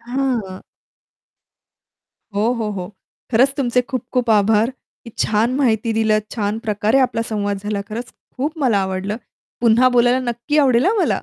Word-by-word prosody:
हां. 240 -6 -3 1.7
हो, 220 +4 +2
हो, 225 -3 -2
हो. 185 -3 -5 0.4
खरंच 265 +4 +4
तुमचे 250 -2 +1
खूप-खूप 250 -1 -2
आभार, 215 +3 +3 0.3
...की 230 - -9
छान 225 +4 +1
माहिती 230 -4 +1
दिलं. 220 -1 +2
छान 210 -1 -2
प्रकारे 215 +3 +1
आपला 245 -3 +1
संवाद 205 -2 -1
झाला, 205 0 -3
खरंच 235 +3 -6 0.2
खूप 300 +5 -2
मला 240 -8 +2
आवडलं. 190 +3 -3 0.4
पुन्हा 240 +2 +5
बोलायला 245 +2 +4
नक्की 280 +6 -1
आवडेल 260 -2 +4
हां 430 - +3
मला! - - +1
230 Hz, 145 wpm, -19 LUFS, 210-255 Hz, 1.7 s, पुन्हा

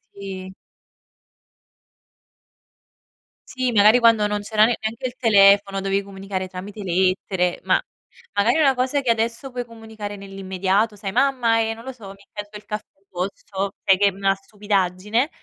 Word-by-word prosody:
Sì. 190 -1 -7 3.0
Sì, 255 -1 -1
magari 215 +3 +6
quando 230 -3 +5
non 210 0 -1
c'era 215 +1 +3
ne 240 - +1
neanche 225 +4 -4
il 250 0 -3
telefono 200 -3 +5
dovevi 195 +1 0
comunicare 195 -1 -5
tramite 195 +3 -8
lettere, 185 0 0
ma - - +2 0.5
magari 215 +7 +2
una 285 -4 +4
cosa 260 +3 0
che 245 - +2
adesso 230 +3 -2
puoi 245 0 -3
comunicare 220 -3 -8
nell'immediato, 195 +2 -1
sai: 200 -1 -5
"Mamma, 245 -2 +2
ehm, 225 0 -1
non 230 - -12
lo 265 - -5
so, 230 -6 -12
mi 195 - -10
è - - -30
caduto 205 0 -7
il 210 - -16
caffè. 210 0 -4 0.2
Posso" 195 +2 -4
Sai 195 -1 +5
che 205 - +5
è - - +5
una 195 0 +1
stupidaggine 200 - -1
205 Hz, 155 wpm, -22 LUFS, 195-230 Hz, 3.0 s, magari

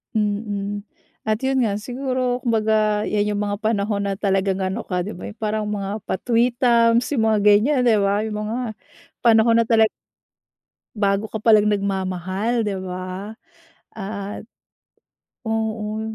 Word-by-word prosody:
Mm. 205 -1 -2 0.4
At 215 0 0
'yun 265 -1 +1
nga, 200 - 0
siguro 255 0 -1
kumbaga, 215 -2 +2
'yan 210 0 0
'yung 205 - -1
mga 205 0 -1
panahon 205 -2 0
na 200 - 0
talagang 195 -2 +1
ano 190 0 -2
ka, 180 -1 -1
'di 200 +3 -5
ba, - - -8
'yung 215 - -18
parang 215 0 -1
mga 205 0 -4
pa-tweetums 235 +1 +2
'yung 220 - +2
mga 215 - +3
ganyan, 210 +8 +4
'di 235 -3 +4
ba, 200 +1 +2
'yung 215 -1 -3
mga 220 +2 -3 0.7
panahon 230 0 +5
na 230 - +3
tala 220 -1 +4 1.1
Bago 200 +1 +2
ka 220 - -3
palang 215 -2 +5
nagmamahal, 195 +1 -1
'di 205 -2 -1
ba, 185 +3 -6 0.6
at 200 0 -6 1.0
oo. 220 -1 -2
210 Hz, 140 wpm, -22 LUFS, 200-225 Hz, 1.1 s, panahon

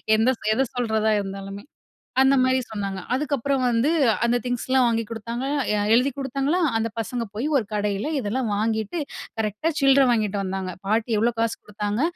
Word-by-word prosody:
எந்த 220 +3 +3 0.2
எத 265 +5 +2
சொல்றதா 220 -3 +1
இருந்தாலுமே. 195 0 -6 0.6
அந்த 265 +1 +5
மாரி 260 0 +3
சொன்னாங்க. 200 -3 -4
அதுக்கப்புறம் 275 -1 0
வந்து, 240 +3 +2 0.4
அந்த 235 +1 +2
திங்ஸ்லாம் 250 +1 +1
வாங்கி 230 -1 +1
குடுத்தாங்க, 230 +3 -4 0.3
எ - - +2 0.2
எழுதி 250 +4 +4
குடுத்தாங்களா! 275 +5 0 0.2
அந்த 225 +1 -1
பசங்க 235 +1 -2
போயி 230 +7 -2
ஒரு 250 - +2
கடையில 205 +6 -1
இதெல்லாம் 235 0 -1
வாங்கிட்டு, 220 - -1 0.4
கரெக்ட்டா 215 +9 -1
சில்ற 275 0 +6
வாங்கிட்டு 210 -3 0
வந்தாங்க. 190 -1 -3
பாட்டி 220 +2 +1
எவ்ளோ 235 +2 +2
காசு 230 0 0
குடுத்தாங்க? 210 +3 -3
230 Hz, 155 wpm, -24 LUFS, 210-260 Hz, 0.6 s, சில்ற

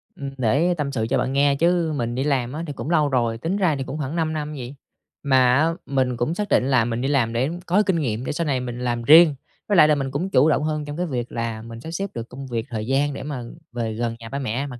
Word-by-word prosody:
Ừm, 140 -1 -5
để 140 +9 +2
tâm 140 -2 -2
sự 110 -4 -1
cho - - +2
bạn 130 +2 -1
nghe 140 0 +3
chứ 170 0 +2
mình 120 -2 -2
đi 135 - -1
làm 130 -3 0
á, 160 +2 -4
thì 145 - -4
cũng 145 - -6
lâu 155 -4 +3
rồi, 120 -3 0
tính 170 - -2
ra 175 -7 +2
thì 135 - -3
cũng 150 - -6
khoảng 150 +2 -4
5 160 -1 0
năm 150 0 -4
gì. 130 +1 -7 0.5
Mà 130 -2 +4
á, 155 +4 +3 0.2
mình 130 -3 0
cũng 120 +8 0
xác 210 +1 -3
định 125 - +3
là 125 -4 +3
mình 120 0 -2
đi 135 - 0
làm 125 -5 +1
để 130 +5 +1 0.2
có 200 +5 +3
kinh 180 -4 +1
nghiệm 120 -3 -2
để - - -2
sau 165 +2 -2
này 130 -3 +1
mình 120 -1 -5
làm 120 -1 -2
riêng. 155 +2 +7 0.3
Với 205 - +2
lại 155 - +8
là 150 - +4
mình 135 -1 -3
cũng 170 +7 -2
chủ 155 -3 +4
động 150 - +2
hơn 155 -1 -2
trong 145 +2 -6
cái 180 - -1
việc 125 -6 -4
là 115 -1 -3
mình 115 0 -9
sắp 160 - -7
xếp 195 +3 -3
được 115 0 -6
công 135 +1 -8
việc, 115 -1 -3
thời 110 -1 -4
gian 140 +2 +1
để 135 - -6
mà 140 -4 -5 0.3
về 115 -2 -3
gần 115 0 -2
nhà 115 -1 -9
ba 140 - -3
mẹ 130 +2 -2
mặc 125 -3 -9
135 Hz, 290 wpm, -23 LUFS, 120-155 Hz, 0.5 s, lại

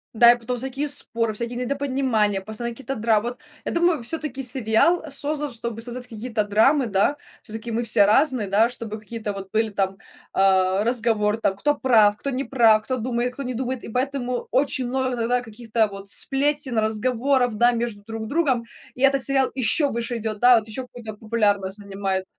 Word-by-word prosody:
Да, 235 +1 +8
и 240 - +2
потом 245 +1 -4
всякие 265 +4 -2
споры, 230 -5 0
всякие 235 +3 -3
недопонимания, 255 -6 0
постоянные 220 +4 -6
какие-то 270 +2 -5
драмы. 225 0 +1
Вот 245 - -10 0.3
я - - -2
думаю, 340 -6 +1
всё-таки 275 0 -3
сериал, 250 +7 +2
э, 315 - -8
создан, 290 +1 -2
чтобы 235 -1 -6
создавать 245 +1 -6
какие-то 225 -1 -3
драмы, 225 +7 +3
да. 205 +6 +1 0.2
Всё-таки 225 +2 -7
мы 230 +1 -1
все 215 -3 +4
разные, 250 0 +2
да, 210 +4 +3
чтобы 225 -3 -7
какие-то 215 -1 -6
вот 195 -1 -8
были 220 0 +1
там, 195 -2 -2 0.3
а, 190 0 +3
разговоры 225 -3 +1
там, 195 - 0
кто 295 +8 +1
прав, 220 -5 +4
кто 275 - -4
не 265 0 -2
прав, 225 -5 +4
кто 255 +3 -2
думает, 245 +1 -2
кто 280 - -7
не 250 -1 -4
думает, 255 0 -3
и - - -8
поэтому 250 0 -2
очень 260 -1 0
много 260 0 -1
иногда 245 +1 0
каких-то 225 -1 -1
вот 195 0 -9
сплетен, 280 -1 +2
разговоров, 245 +3 +1
да, 240 +3 +4
между 230 -3 -3
друг 225 0 -6
другом. 270 -5 +1 0.3
И 255 - -11
этот 275 -1 +3
сериал 270 -1 +1
ещё 265 +4 +3
выше 235 0 -3
идёт, 215 -1 -4
да, 245 0 +6
вот 215 - -12
ещё 220 +4 -5
какую-то 240 -3 -9
популярность 205 -3 0
занимает. 195 -2 -3
235 Hz, 190 wpm, -23 LUFS, 215-260 Hz, 0.3 s, Да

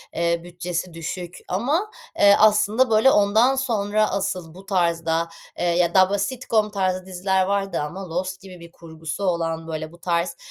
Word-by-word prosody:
eee, 170 0 0
bütçesi 175 0 -5
düşük 170 +2 -6
ama, 295 - -1 0.3
eee, 200 0 +7
aslında, 215 +3 +4
böyle, 225 +4 +5
ondan 220 +5 +4
sonra 215 -5 0
asıl 190 -4 -3
bu 190 +2 -13
tarzda, 170 -3 0 0.3
eee, - - -1
ya 170 0 +2
da 185 -1 +5
bu 200 0 0
sitcom 220 0 0
tarzı 185 -2 -1
diziler 190 0 0
vardı 195 0 -1
ama 180 +5 -6
Lost 185 +3 -3
gibi 185 -2 -12
bir 170 0 -13
kurgusu 160 +1 -7
olan, 165 -3 -1
böyle, 155 -1 -5
bu 170 - -15
tarz 170 0 -1
185 Hz, 165 wpm, -23 LUFS, 170-205 Hz, 0.3 s, eee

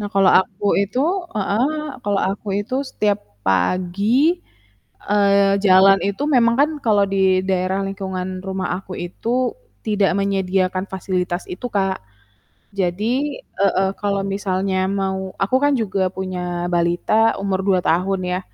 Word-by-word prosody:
Nah 205 - -3
kalau 195 -1 +5
aku 205 +1 -6
itu 200 +5 -2 0.4
heeh, 210 +4 +1 0.4
kalau 200 -1 +1
aku 200 +1 -6
itu 250 +5 -5 0.2
setiap 205 -1 0 0.3
pagi, 185 - +2 0.7
eee, 200 -1 +3
jalan 195 +1 +6
itu 200 +7 -3
memang 235 -4 +4
kan 300 +2 +4
kalau 205 -3 +4
di 190 -1 +2
daerah 185 +1 0
lingkungan 190 -1 -5
rumah 190 0 -3
aku 190 -1 -11
itu 240 - -2 0.3
tidak 205 -3 +2
menyediakan 190 -1 0
fasilitas 180 -1 -2
itu, 185 +7 -5
Kak. 195 -2 0 0.8
Jadi 220 +10 -1 0.2
heeh 195 -1 +2
kalau 200 -1 0
misalnya 195 -1 -1
mau 190 -1 -2
aku 230 +7 +2
kan 290 - +4
juga 190 -4 0
punya 180 -2 -4
balita 175 +6 +2
umur 195 -1 0
2 190 -2 +3
tahun 185 +3 +1
ya, 180 - -1
195 Hz, 135 wpm, -20 LUFS, 185-205 Hz, 0.8 s, jalan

